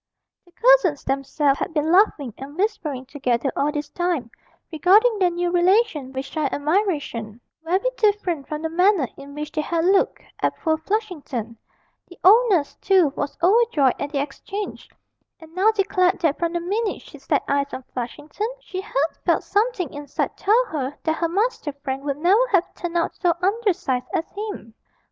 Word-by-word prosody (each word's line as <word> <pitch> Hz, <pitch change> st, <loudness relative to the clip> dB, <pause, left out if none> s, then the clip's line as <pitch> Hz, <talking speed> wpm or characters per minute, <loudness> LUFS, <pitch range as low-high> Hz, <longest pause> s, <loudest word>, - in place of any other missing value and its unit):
The -, -, -21 dB
cousins 445 Hz, -, +4 dB
themselves 275 Hz, +1 st, 0 dB
had 325 Hz, -, -4 dB
been 305 Hz, +1 st, +1 dB
laughing 335 Hz, -, +3 dB
and 280 Hz, +4 st, -9 dB
whispering 325 Hz, -, -2 dB
together 260 Hz, -2 st, -1 dB
all 290 Hz, +1 st, +1 dB
this 295 Hz, -1 st, -4 dB
time, 345 Hz, -10 st, -2 dB, 0.4 s
regarding 410 Hz, +8 st, +4 dB
their 365 Hz, -2 st, +4 dB
new 350 Hz, 0 st, -1 dB
relation 355 Hz, -, +2 dB
with 265 Hz, 0 st, -4 dB
shy 295 Hz, 0 st, -2 dB
admiration, 290 Hz, -, -1 dB, 0.2 s
very 370 Hz, +8 st, 0 dB
different 400 Hz, -9 st, +1 dB
from 305 Hz, +1 st, -5 dB
the 320 Hz, -, -1 dB
manner 360 Hz, -3 st, +3 dB
in 280 Hz, +1 st, -11 dB
which 300 Hz, 0 st, -5 dB
they 305 Hz, -, -1 dB
had 330 Hz, +2 st, -1 dB
looked 385 Hz, +1 st, +2 dB, 0.2 s
at -, -, 0 dB
poor 315 Hz, -1 st, 0 dB
Flushington; 315 Hz, -, -3 dB, 0.5 s
the 355 Hz, -, -15 dB
old 455 Hz, +6 st, +7 dB
nurse, 330 Hz, -8 st, +1 dB
too, 370 Hz, -7 st, +3 dB
was 285 Hz, -, -4 dB
overjoyed 375 Hz, -, +4 dB
at 285 Hz, -, -3 dB
the 285 Hz, -, -1 dB
exchange, 390 Hz, +9 st, -5 dB, 0.5 s
and 320 Hz, -1 st, -15 dB
now 380 Hz, +4 st, +3 dB
declared 390 Hz, -4 st, +2 dB
that 310 Hz, -3 st, +1 dB
from 340 Hz, 0 st, -1 dB
the 345 Hz, -, 0 dB
minute 405 Hz, +5 st, -2 dB
she -, -, -13 dB
set -, -, 0 dB
eyes 280 Hz, 0 st, 0 dB
on 260 Hz, -, -6 dB
Flushington, 295 Hz, -, -4 dB
she 375 Hz, -6 st, -6 dB
had 385 Hz, -, -15 dB, 0.3 s
felt -, -, +2 dB
something 410 Hz, -, 0 dB
inside 290 Hz, -1 st, -3 dB
tell 445 Hz, +5 st, +3 dB
her 290 Hz, -, -4 dB
that 315 Hz, 0 st, 0 dB
her 335 Hz, -, 0 dB
Master 395 Hz, -4 st, -1 dB
Frank 270 Hz, 0 st, -3 dB
would 280 Hz, -1 st, -2 dB
never 390 Hz, +10 st, +3 dB
have 370 Hz, -2 st, +2 dB
turned 345 Hz, -1 st, -4 dB
out 335 Hz, -, 0 dB
so 350 Hz, -3 st, +1 dB
undersized 380 Hz, -, 0 dB
as 325 Hz, -, 0 dB
him! 405 Hz, -, -6 dB
335 Hz, 175 wpm, -23 LUFS, 285-395 Hz, 0.5 s, old